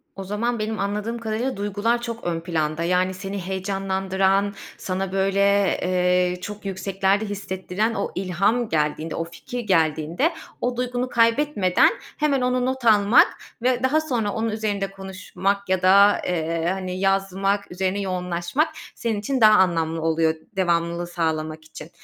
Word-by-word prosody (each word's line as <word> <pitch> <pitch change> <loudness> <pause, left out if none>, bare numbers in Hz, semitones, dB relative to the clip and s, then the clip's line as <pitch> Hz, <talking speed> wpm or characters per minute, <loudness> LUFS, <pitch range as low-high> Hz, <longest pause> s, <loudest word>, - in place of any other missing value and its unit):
O 195 - -6
zaman 215 +4 -2
benim 215 +1 -2
anladığım 210 +4 -2
kadarıyla 230 +2 -2
duygular 205 +4 0
çok 230 -1 -6
ön 170 -1 -1
planda. 160 -2 -1
Yani, 180 +2 +1
seni 195 +1 -5
heyecanlandıran, 195 +1 0 0.2
sana, 190 0 -3
böyle, 195 0 +1 0.4
eee, 180 0 +1
çok 210 +1 -7
yükseklerde 195 +2 0
hissettiren 200 +1 -2
o 200 - -2
ilham 195 +6 0
geldiğinde, 155 +1 -1
o - - -1
fikir 170 +9 -7
geldiğinde, 165 - +1 0.3
o 245 0 -1
duygunu 250 0 -2
kaybetmeden 230 -5 +3 0.3
hemen 290 -3 +1
onu 250 0 +1
not 260 -1 -2
almak 210 0 +6 0.3
ve 250 +1 +1
daha 305 +4 +3
sonra 235 -9 -1
onun 225 +1 -1
üzerinde 205 -3 -2
konuşmak 195 0 -3
ya 190 -1 +1
da, 200 +2 +6
eee, 165 -1 -1
hani, 185 -1 -4
yazmak, 195 +1 0
üzerine 190 +2 -1
yoğunlaşmak 180 - -1 0.3
senin 225 -3 -2
için 255 +5 -2
daha 215 -1 +8
anlamlı 165 -3 +1
oluyor, 160 0 +1 0.2
devamlılığı 170 -2 0
sağlamak 160 -2 -2
için. 155 0 -11
195 Hz, 140 wpm, -23 LUFS, 180-220 Hz, 0.4 s, daha